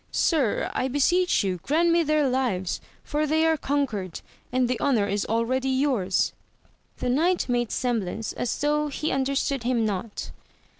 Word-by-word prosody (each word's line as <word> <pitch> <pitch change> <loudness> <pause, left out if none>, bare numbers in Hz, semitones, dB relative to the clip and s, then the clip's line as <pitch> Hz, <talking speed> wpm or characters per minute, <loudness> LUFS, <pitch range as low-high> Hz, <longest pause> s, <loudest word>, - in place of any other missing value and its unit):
Sir, 285 - +1
I 255 - 0
beseech 340 - +2
you 185 -2 -1
grant 335 +4 +2
me 340 0 +4
their 305 -2 +2
lives, 245 -9 -1 0.2
for 300 +1 -1
they 315 +2 +2
are 320 0 +4
conquered, 265 - -2 0.3
and 255 -1 +2
the 250 0 -1
honour 245 -8 +2
is 200 0 -1
already 250 +4 0
yours. 260 -8 +1 0.6
The - - -3
knight 335 +7 +2
made 240 -2 0
semblance 225 -4 -2
as 245 - -2
though 300 +1 +1
he 300 +2 -2
understood 270 0 0
him 235 -1 +1
not. 205 +1 -4
260 Hz, 155 wpm, -25 LUFS, 225-295 Hz, 0.6 s, me